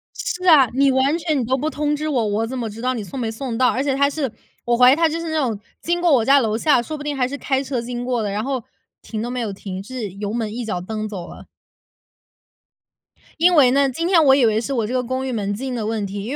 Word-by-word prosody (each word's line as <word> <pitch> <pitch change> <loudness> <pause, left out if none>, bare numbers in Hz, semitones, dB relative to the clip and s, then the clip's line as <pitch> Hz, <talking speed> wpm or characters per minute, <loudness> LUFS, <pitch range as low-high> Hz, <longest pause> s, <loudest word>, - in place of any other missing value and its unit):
是 365 +1 -4
啊， 295 -7 +7
你 275 +1 +3
完 265 +4 +2
全 315 -4 -1
你 245 - -1
都 260 +3 0
不 300 +4 -1
通 295 -1 -1
知 305 +1 -3
我， 255 -7 0
我 215 +2 -1
怎 260 +3 -5
么 235 -3 -3
知 220 +2 -9
道 255 +1 0
你 225 -4 -4
送 270 +6 -7
没 230 -2 -2
送 230 +1 -4
到？ 255 +1 +4
而 260 - -1
且 280 -2 0
他 280 +1 +3
是 280 -5 -3 0.3
我 240 0 +2
怀 250 +1 +7
疑 - - +5
他 330 +1 +3
就 320 +1 -3
是 335 -1 -4
那 315 - -1
种， 225 -7 -1 0.2
经 345 +1 -1
过 350 -2 +3
我 255 -5 +4
家 275 +2 +6
楼 220 -4 0
下， 250 0 +3
说 305 +6 -6
不 290 - -8
定 295 -1 -3
还 250 -2 +1
是 285 +2 -5
开 270 -1 -1
车 260 -3 -3
经 240 0 -5
过 245 -2 -1
的， 205 - -2
然 210 +2 -2
后 265 -3 -2 0.4
停 220 -2 -5
都 240 - -3
没 250 0 -3
有 225 -4 -2
停， 190 -1 -7
是 235 -2 -5
油 200 +2 -5
门 225 -3 -2
一 240 -1 -4
脚 180 -5 -3
蹬 215 +3 -4
走 190 -5 -7
了。 - - -12 1.9
因 350 +2 +5
为 260 -5 +6
呢， 275 0 +3
今 330 +6 -3
天 350 -2 +4
我 265 -1 +7
以 270 -3 +4
为 220 -1 +2
是 275 +4 -3
我 230 -4 0
这 240 - -4
个 255 - +1
公 260 +2 -3
寓 260 - -3
门 205 -3 -2
禁 255 +5 -4
的 230 -3 -3
问 220 -1 -2
题， 200 +1 -5
因 245 - -5
255 Hz, 310 characters per minute, -21 LUFS, 225-280 Hz, 1.9 s, 啊